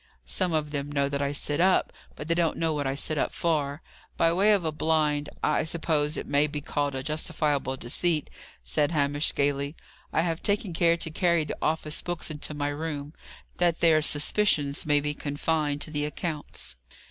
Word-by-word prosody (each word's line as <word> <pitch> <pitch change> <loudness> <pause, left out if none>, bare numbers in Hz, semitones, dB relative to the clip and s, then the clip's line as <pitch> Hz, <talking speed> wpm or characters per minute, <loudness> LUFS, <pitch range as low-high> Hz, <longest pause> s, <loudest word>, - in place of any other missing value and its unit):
"Some 185 -2 0
of 155 -2 0
them 145 0 -3
know 140 -1 +1
that 140 0 -1
I 140 0 0
sit 145 0 0
up; 185 +1 +3 0.2
but 150 - -7
they 165 - +3
don't 170 -1 +1
know 165 -1 +1
what 145 -2 -1
I 135 - -1
sit 155 +1 -1
up - - 0
for. 150 -3 -1 0.3
By 165 0 +4
way 200 +4 +5
of 200 -5 +3
a 160 - 0
blind 150 -2 +1
I - - +2
suppose 155 -2 0
it - - -4
may 145 +1 +2
be 150 0 -4
called 145 -1 -2
a 130 - -3
justifiable 150 -3 -1
deceit," 150 +6 0 0.3
said 145 - +1
Hamish, 145 0 +2
gaily 140 +1 0 0.4
"I - - +2
have 165 -1 -1
taken 205 -3 0
care 170 0 +3
to 165 -1 -4
carry 170 0 +2
the - - -5
office 155 -1 0
books 175 -3 -4
into 150 0 -4
my 145 0 -1
room, 145 -1 -4 0.4
that 175 -2 +2
their 160 -2 +5
suspicions 150 -1 +2
may 145 -1 +4
be 150 0 -2
confined 145 0 -1
to 155 - -5
the 150 -1 -1
accounts. 150 - -5
150 Hz, 195 wpm, -27 LUFS, 145-165 Hz, 0.4 s, way